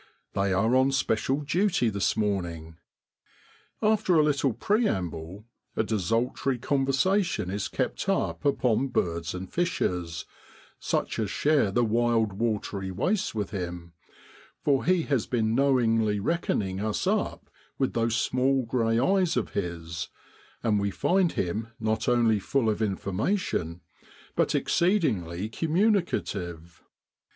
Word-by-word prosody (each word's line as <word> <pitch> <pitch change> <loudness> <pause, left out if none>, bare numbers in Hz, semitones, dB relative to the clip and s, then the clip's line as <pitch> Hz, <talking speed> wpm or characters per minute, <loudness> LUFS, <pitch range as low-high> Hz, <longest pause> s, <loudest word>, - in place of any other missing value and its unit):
They 100 0 +1
are 110 +6 +2
on 130 +1 +4
special 130 +2 0
duty 165 - +1
this 100 +2 0
morning. 85 -6 -2 1.0
After 215 -4 +3
a 155 - +6
little 140 -3 +2
preamble, 100 - -1 0.3
a - - +1
desultory 115 +5 0
conversation 135 - +1
is 100 0 -2
kept - - -2
up 85 0 0
upon 130 -2 +2
birds 85 - -1
and 95 +1 -5
fishes 90 - -1 0.5
such - - -1
as 110 -3 -1
share 145 -2 +2
the 120 +5 +2
wild 115 -2 +2
watery 100 -3 -2
wastes 185 - -1
with 105 -2 -2
him, 85 -3 -5 0.7
for 140 -2 +2
he 180 -1 +3
has 135 -8 0
been 110 -3 0
knowingly 115 -5 +2
reckoning 100 - -1
us 105 0 -1
up - - -1 0.3
with 135 - 0
those 115 0 +1
small 130 +2 +1
grey 115 -1 +1
eyes 185 +1 +2
of 120 - -1
his; 85 -3 -4 0.5
and 105 -3 +2
we 100 0 0
find 180 - +1
him 105 +5 -2
not 110 +1 0
only 115 -3 +3
full 115 +2 +1
of 105 - -3
information, 100 - -1 0.5
but - - +1
exceedingly 110 - +1
communicative. 110 - -1
110 Hz, 125 wpm, -27 LUFS, 95-135 Hz, 1.0 s, a